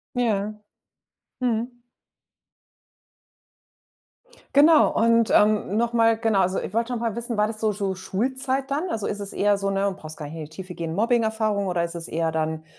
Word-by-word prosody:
Ja. 215 -4 0 0.9
Mhm. 240 0 -2 2.7
Genau 300 +3 +6
und 230 0 +3
ähm, 210 -1 +3
noch 235 +1 +1
mal 230 -1 +4
genau. 225 -4 +2
Also, 185 +1 +1
ich - - -6
wollte 230 +3 -1
noch 240 - -2
mal 230 -3 -1
wissen, 235 -1 -3
war 210 0 +3
das 215 0 -5
so 215 -1 +1
so 195 -2 -2
Schulzeit 260 +8 -2
dann? 310 +6 -1
Also, 220 -10 -3
ist 205 0 -3
es 200 - -5
eher 205 0 +2
so 195 0 -2
'ne- 195 0 0
du - - -5
brauchst 155 -4 -9
gar 150 - -7
nicht 155 - -9
in 155 - -5
die - - -12
Tiefe 180 +2 -8
gehen- 165 -1 -4
Mobbing-Erfahrung 220 -2 +1
oder 175 -2 0
ist 170 0 -5
es 170 -1 -4
eher 165 0 -1
dann, 160 0 -2
215 Hz, 190 wpm, -24 LUFS, 190-235 Hz, 2.7 s, Genau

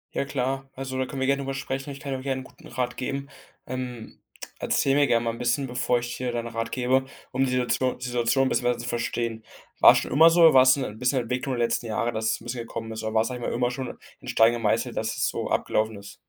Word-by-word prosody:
Ja - - 0
klar. 135 0 -2
Also, 130 0 -5
da 130 - 0
können 135 -1 -5
wir - - +2
gerne 140 0 +2
darüber 135 0 -3
sprechen. 135 +1 -4
Ich 140 0 -7
kann 140 -1 -4
auch 130 - -5
gerne 130 -1 -2
'n - - -10
guten - - -16
Rat 125 0 -3
geben. 140 +2 -4 0.4
Ähm, 125 -2 -6 0.4
erzähl 135 - +1
mir 145 0 +4
gerne 115 -1 +2
mal 115 - 0
'n 115 - -9
bisschen, 125 +3 +1
bevor 125 0 0
ich 120 0 -5
dir 125 -1 -2
da 120 - -3
'n 115 - -10
Rat 115 0 -4
gebe, 130 +1 +1 0.3
um 135 +1 +1
die - - -1
Situation 125 0 0
die 125 - -7
Situation 125 +2 +2
bisschen 125 - 0
besser 125 -1 +2
zu 120 - -6
verstehen. 115 -1 -2 0.4
War - - +9
es - - +2
schon - - -3
immer 160 +3 +7
so, 170 +1 +3
oder 165 -3 +8
war 130 - +8
es 130 +1 +6
'n 110 -6 -4
bisschen 125 +1 +2
Entwicklung 125 +2 -2
der 120 - +1
letzten 115 0 -2
Jahre, 115 +2 -1
dass 110 0 -2
es - - -3
'n - - -13
bisschen 120 0 -4
gekommen 115 -1 -6
ist, 110 - -5
oder 110 0 -3
war, 110 - +4
sage 125 0 -4
ich - - -3
mal - - -2
immer 120 0 +1
schon 130 0 -5 0.2
in - - -14
Stein 115 +1 +4
gemeißelt, 115 +1 0
dass 110 0 -2
es - - +1
so - - -3
abgelaufen 110 0 0
ist? 100 -1 -11
125 Hz, 275 wpm, -26 LUFS, 115-135 Hz, 0.4 s, War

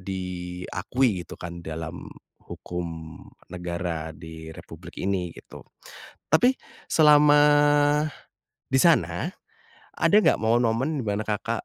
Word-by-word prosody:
diakui 90 +4 -2
gitu - - -11
kan 85 0 -8
dalam 80 +1 -7 0.3
hukum 80 -3 -7 0.3
negara 85 -3 -4
di 80 0 -10
Republik 80 - -12
ini 95 -2 -1
gitu, - - -12 0.7
tapi 245 - +3 0.3
selama, 150 -1 +6 1.3
di 130 0 +2
sana, 170 0 +2 0.7
ada - - +2
nggak - - +3
momen-momen 120 +6 +1
di 120 - -5
mana 105 +1 -1
Kakak, 110 +2 -2
90 Hz, 105 wpm, -25 LUFS, 85-125 Hz, 1.3 s, selama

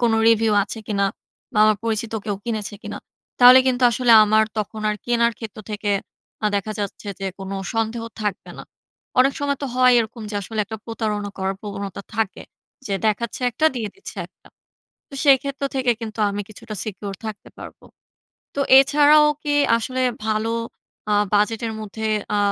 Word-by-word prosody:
কোনো 230 -2 +3
রিভিউ 225 -1 +3
আছে 210 +3 -6
কিনা 200 -2 0 0.5
বা, - - -1
আমার 215 -1 +4
পরিচিত 225 0 -2
কেউ 205 -2 -2
কিনেছে 215 -3 -3
কিনা? - - -6 0.4
তাহলে 250 +1 +9
কিন্তু 255 -1 +1
আসলে 240 0 +3
আমার 215 +1 +4
তখন 215 +1 -4
আর 210 - -2
কেনার 235 -1 +2
ক্ষেত্র 220 -2 -8
থেকে 210 0 -2 0.5
আ - - +5
দেখা 205 +2 -3
যাচ্ছে 205 0 -5
যে 195 - -2
কোন 190 0 -7 0.2
সন্দেহ 225 +1 -1 0.2
থাকবে 210 -2 -3
না। - - -7 0.6
অনেক 265 +2 +5
সময় 285 -1 0
তো - - -1
হয় 255 0 +5
এরকম 230 0 -3
যে - - -6
আসলে 220 +3 -7
একটা 220 +2 -7
প্রতারণা 215 -3 -3
করার 190 0 -1
প্রবণতা 200 -1 -6
থাকে। 225 -1 -1 0.4
যে 200 - -1
দেখাচ্ছে 215 +3 -1
একটা 280 +7 +1
দিয়ে 225 -4 -3
দিচ্ছে 390 - -11
একটা। - - -24 0.6
তো - - -17
সেক্ষেত্র 275 0 +3
থেকে 255 -2 +2
কিন্তু 220 -1 -6
আমি 200 +1 -3
কিছুটা 215 +1 -9
সিকিউর 205 -1 -6
থাকতে 215 -2 -7
পারব। - - -10 0.8
তো 280 - -2 0.2
এছাড়াও 295 +2 +6 0.2
কি 290 -1 0 0.2
আসলে 255 +3 -2 0.2
ভালো 215 +1 0 0.6
আ - - +3 0.2
বাজেটের 225 +2 +1
মধ্যে 220 +1 -5 0.3
আ - - +2
220 Hz, 170 wpm, -22 LUFS, 210-245 Hz, 0.8 s, তাহলে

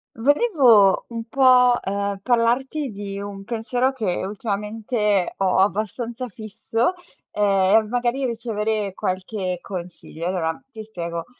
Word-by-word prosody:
Volevo 250 - +4
un 230 -1 -5
po' 250 -1 +5
ehm, 200 0 -2
parlarti 255 +4 +1
di 200 -1 -6
un 200 -1 -7
pensiero 245 +4 -1
che 195 -7 -2
ultimamente 210 0 -1
ho 190 -1 +2
abbastanza 220 +5 -1
fisso, 225 - -2 0.4
ehm, 200 +1 +3
e - - -10
magari 245 +3 -1
ricevere 220 -4 -2
qualche 185 -1 -3
consiglio. 175 -3 -7
Allora 175 -1 -1
ti 220 - -8
spiego. 170 -5 -5
215 Hz, 115 wpm, -22 LUFS, 195-240 Hz, 0.4 s, po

